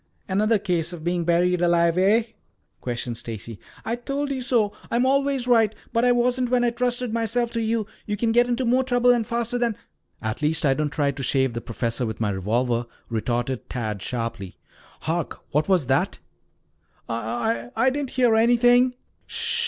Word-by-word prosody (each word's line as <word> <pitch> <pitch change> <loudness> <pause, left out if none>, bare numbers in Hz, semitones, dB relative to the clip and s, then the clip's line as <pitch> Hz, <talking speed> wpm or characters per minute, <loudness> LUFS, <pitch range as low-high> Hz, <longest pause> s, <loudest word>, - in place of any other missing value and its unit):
"Another 215 +3 +2
case 180 -4 -1
of 165 -3 -8
being 175 0 0
buried 175 +1 +2
alive, 170 -1 +3
eh?" 200 +5 +4 0.6
questioned 120 -1 -4
Stacy. 115 -2 -7 0.3
"I 230 - 0
told 280 +4 -3
you 265 -2 -2
so. 235 -5 +1 0.2
I 235 - +1
always 275 0 +2
am 250 - +4
right. 220 -2 +3 0.2
But 230 +1 +2
I 245 - +5
wasn't 245 +1 +1
when 250 -1 +2
I 240 - +2
trusted 245 -1 -1
myself 230 +1 0
to 230 - -1
you. 225 -1 0 0.2
You 210 0 -2
can 225 +2 +1
get 240 +1 +4
into 245 +1 0
more 250 +2 +3
trouble, 245 -1 +3
and 235 -3 +1
faster 235 +1 -1
than 235 -3 0 0.2
" - - -47
"At 110 +3 -3
least 150 +1 +1
I 135 - +4
don't 150 +2 -1
try 145 -1 0
to 140 0 -7
shave 130 -1 +1
the 115 - -4
professor 115 +1 -2
with 110 - -5
my 105 -2 0
revolver," 115 +5 0 0.2
retorted 120 +2 -2
Tad 110 -5 -3
sharply. 115 -5 -4 0.5
"Hark! 165 0 -3
What 150 +2 +1
was 180 -7 +3
that?" - - +1 0.9
"I 115 +1 -2
I 260 +4 +3
didn't 280 -1 -3
hear 245 -3 +4
anything." 245 +2 +4
205 Hz, 185 wpm, -24 LUFS, -, 0.9 s, I